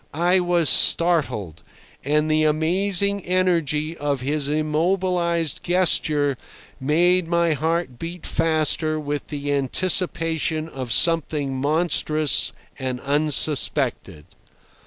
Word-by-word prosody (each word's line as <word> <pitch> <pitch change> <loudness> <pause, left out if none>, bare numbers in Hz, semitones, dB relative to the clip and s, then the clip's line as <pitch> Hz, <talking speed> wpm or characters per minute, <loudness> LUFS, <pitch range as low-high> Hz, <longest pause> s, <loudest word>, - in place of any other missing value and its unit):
I 175 +3 +3
was 175 -2 +1
startled, 145 - +2 0.4
and 150 +2 +1
the 155 0 +2
amazing 190 +6 0
energy 170 -4 0
of 145 -4 -3
his 145 +2 -1
immobilized 170 +2 -1
gesture 155 -6 +1 0.4
made 170 +5 +1
my 170 -1 +1
heart 160 -3 -2
beat 170 +1 -7
faster 155 -1 +1
with 145 -1 -5
the 145 -1 -4
anticipation 160 +2 0
of 130 -6 -7
something 150 -2 +1
monstrous 155 +1 +1 0.3
and 130 -1 -4
unsuspected. 140 - +1
155 Hz, 95 wpm, -22 LUFS, 145-170 Hz, 0.4 s, I